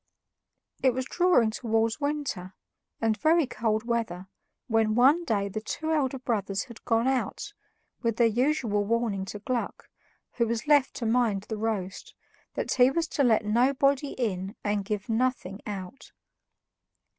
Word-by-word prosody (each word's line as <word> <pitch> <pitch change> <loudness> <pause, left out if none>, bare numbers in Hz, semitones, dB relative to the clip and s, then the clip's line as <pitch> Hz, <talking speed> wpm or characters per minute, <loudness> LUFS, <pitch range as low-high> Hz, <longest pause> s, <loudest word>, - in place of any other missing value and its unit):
It 260 -2 +3
was 260 0 -2
drawing 350 -8 +3
towards 225 +2 0
winter, 285 -11 -3 0.4
and 225 -1 +1
very 315 +8 +3
cold 220 -3 -1
weather, 225 -6 -2 0.4
when 225 -2 +1
one 275 +8 +5
day 200 -8 0
the 215 +2 -5
two 315 +8 -3
elder 275 -4 +1
brothers 205 -6 -2
had 235 -2 -13
gone 230 +2 +2
out, 265 - -2 0.5
with 230 -3 0
their 235 - +5
usual 235 -2 +1
warning 215 -3 -1
to 200 - -6
little 210 +5 -3
Gluck, 240 - -4 0.5
who 235 -1 +2
was 230 +2 -2
left 290 -3 +3
to 235 - -4
mind 225 -4 +1
the 220 0 -5
roast, 205 -4 -3 0.4
that - - -2
he 250 0 +5
was 330 +4 -1
to 285 - +1
let 225 -4 +3
nobody 275 +5 +2
in 195 -5 -3
and 205 -1 0
give 200 0 -4
nothing 225 -4 -1
out. 200 +4 -7
230 Hz, 155 wpm, -27 LUFS, 210-260 Hz, 0.5 s, one